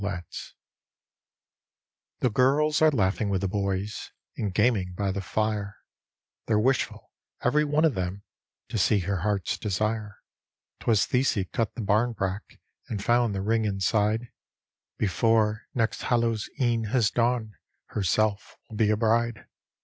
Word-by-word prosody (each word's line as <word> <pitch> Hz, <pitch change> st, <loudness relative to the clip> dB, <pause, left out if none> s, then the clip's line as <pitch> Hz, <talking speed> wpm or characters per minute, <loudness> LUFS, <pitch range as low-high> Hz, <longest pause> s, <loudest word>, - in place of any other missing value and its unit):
letts 90 Hz, -5 st, -6 dB, 1.7 s
The 125 Hz, -, +2 dB
girls 145 Hz, +7 st, +3 dB
are 155 Hz, -, +7 dB
laughing 100 Hz, -5 st, +1 dB
with 95 Hz, -2 st, 0 dB
the 100 Hz, -, 0 dB
boys, 100 Hz, +1 st, -2 dB, 0.3 s
and 105 Hz, -, -2 dB
gaming 95 Hz, -3 st, +1 dB
by 100 Hz, -2 st, 0 dB
the 100 Hz, +1 st, -3 dB
fire, 105 Hz, 0 st, -2 dB, 0.7 s
They're 110 Hz, -, +3 dB
wishful, 130 Hz, +5 st, 0 dB, 0.3 s
every 150 Hz, +5 st, +3 dB
one 150 Hz, +2 st, +2 dB
of 155 Hz, -, +3 dB
them, 95 Hz, +1 st, -4 dB, 0.5 s
to 115 Hz, -, -2 dB
see 100 Hz, +1 st, +3 dB
her 100 Hz, +2 st, -1 dB
heart's 100 Hz, 0 st, -1 dB
desire, 105 Hz, +1 st, -2 dB, 0.6 s
"Twas 110 Hz, -3 st, +2 dB
Thesie 125 Hz, -7 st, +1 dB
cut 115 Hz, -2 st, -1 dB
the -, -, -4 dB
bambrack 105 Hz, -2 st, -1 dB, 0.3 s
and 100 Hz, -3 st, -4 dB
found 120 Hz, -3 st, +2 dB
the 95 Hz, -, -2 dB
ring 110 Hz, +2 st, +1 dB
in 100 Hz, -2 st, -1 dB
side, 110 Hz, +4 st, +1 dB, 0.7 s
Before 110 Hz, +1 st, +1 dB
next 110 Hz, -4 st, 0 dB
Hallows' 115 Hz, -3 st, 0 dB
E'en 120 Hz, -3 st, +1 dB
has 115 Hz, -1 st, +2 dB
dawned 115 Hz, -2 st, 0 dB, 0.4 s
herself 105 Hz, +1 st, 0 dB
will 110 Hz, -, -7 dB
be 105 Hz, -1 st, +3 dB
a 105 Hz, -, +2 dB
bride. 115 Hz, +1 st, +1 dB
110 Hz, 140 wpm, -27 LUFS, 100-115 Hz, 1.7 s, are